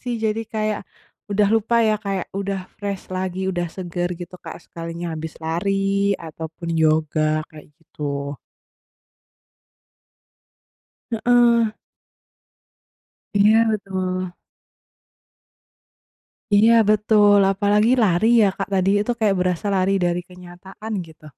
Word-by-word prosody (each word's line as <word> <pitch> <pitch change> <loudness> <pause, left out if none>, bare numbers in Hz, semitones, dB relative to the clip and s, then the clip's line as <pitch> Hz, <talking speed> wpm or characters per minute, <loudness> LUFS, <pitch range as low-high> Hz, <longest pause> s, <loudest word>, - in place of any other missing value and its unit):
sih 245 -1 -3
jadi 220 0 -1
kayak 215 -2 -2 0.5
udah 205 0 +2
lupa 225 +1 +2
ya 215 - +3
kayak 195 -3 -3
udah 195 -1 -3 0.2
fresh 200 -3 -5
lagi 185 0 -3
udah 175 -2 -2
segar 175 0 -4
gitu, 175 +1 -9
Kak, - - -8
sekalinya 170 +1 -6
habis 160 0 -6
lari 195 +4 0
ataupun 160 +1 -8
yoga, 155 0 +2
kayak 155 -2 -13
gitu. 140 -3 -5 2.7
Heeh. 240 +1 +2 2.0
Iya, 210 +2 +5
betul. 185 -3 -3 2.2
Iya, 215 +3 +6 0.2
betul. 210 -1 +4
Apalagi 205 +3 +2
lari 190 +1 +2
ya, 210 - +5
Kak, 195 0 -4
tadi 190 0 +2
itu 210 - -2
kayak 210 -3 +2
berasa 180 +1 -1
lari 190 0 +2
dari 175 0 0
kenyataan 180 +4 -10
gitu. 160 -1 -18
190 Hz, 105 wpm, -21 LUFS, 170-210 Hz, 2.7 s, Iya